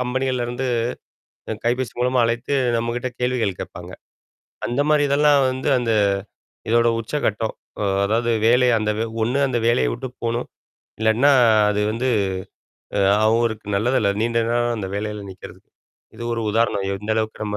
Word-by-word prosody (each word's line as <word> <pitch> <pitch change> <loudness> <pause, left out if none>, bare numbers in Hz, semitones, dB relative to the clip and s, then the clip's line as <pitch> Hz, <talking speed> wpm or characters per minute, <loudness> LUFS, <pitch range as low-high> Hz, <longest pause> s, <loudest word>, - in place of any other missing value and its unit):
கம்பெனிகள்லேருந்து 125 0 -2 1.0
கைபேசி 125 +1 0
மூலமா 125 +1 +2
அழைத்து 120 +4 -2 0.2
நம்மகிட்ட 115 +2 -2
கேள்விகள் 125 -6 0
கேட்பாங்க. - - -8 0.8
அந்த 120 +4 -1
மாதிரி 150 -1 +4
இதெல்லாம் 145 0 +4
வந்து 130 +2 -3
அந்த 120 -2 0 0.8
இதோட 115 +1 +4
உச்சகட்டம், 110 -3 -2 0.3
அ - - 0 0.2
அதாவது 115 +3 +1 0.2
வேலை 125 +2 +4
அந்த 105 0 -1
வே 110 - 0 0.2
ஒண்ணு. 120 +5 0
அந்த 120 -2 0
வேலையை 65 - +3
விட்டு 130 - -5 0.2
போணும் 115 +1 -2 0.5
இல்லன்னா 110 +6 +4 0.4
அது 105 0 0
வந்து 120 +4 -1 0.9
அ - - +3 0.3
அவருக்கு 110 -1 +1
நல்லதல்ல. 110 -1 +1
நீண்ட 115 0 +1
நாள் 120 0 +1
அந்த 100 -3 -4
வேலையில 105 0 -4
நிற்கிறதுக்கு 95 -1 -13 0.5
இது 120 - -8
ஒரு 115 -1 -2
உதாரணம். 110 -2 +1
எந்த 105 +2 -5
அளவுக்கு 110 -1 -2
நம்ம 105 0 -3
115 Hz, 140 wpm, -21 LUFS, 110-125 Hz, 1.0 s, மாதிரி